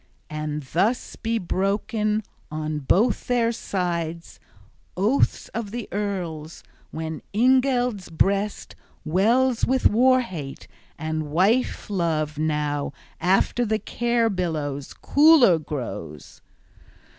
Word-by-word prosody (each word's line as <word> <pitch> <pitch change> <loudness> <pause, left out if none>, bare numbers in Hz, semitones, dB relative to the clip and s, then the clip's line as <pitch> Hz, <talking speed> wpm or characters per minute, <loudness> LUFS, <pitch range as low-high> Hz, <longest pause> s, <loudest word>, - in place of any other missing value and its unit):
And 150 -1 -3
thus 195 - 0
be 230 +1 -1
broken 210 +3 -1 0.3
on 155 0 -3
both 205 - +1
their 235 -2 +2
sides 170 -6 -3 0.6
oaths 215 +9 +1
of 220 0 -4
the 235 +1 -5
earls, 175 -6 -4 0.3
when 160 -1 -5
Ingeld's 250 -3 +2
breast 200 +5 0 0.3
wells 230 +9 +2
with 260 0 +1
war 255 +4 +4
hate, 155 - -7 0.3
and 155 -1 -3
wife 195 - +1
love 160 -6 -1
now 150 -2 -1 0.3
after 190 +7 +2
the 220 -1 +1
care 235 +1 0
billows 155 -7 -3
cooler 285 - +5
grows. 105 - -7
190 Hz, 100 wpm, -24 LUFS, 155-230 Hz, 0.6 s, cooler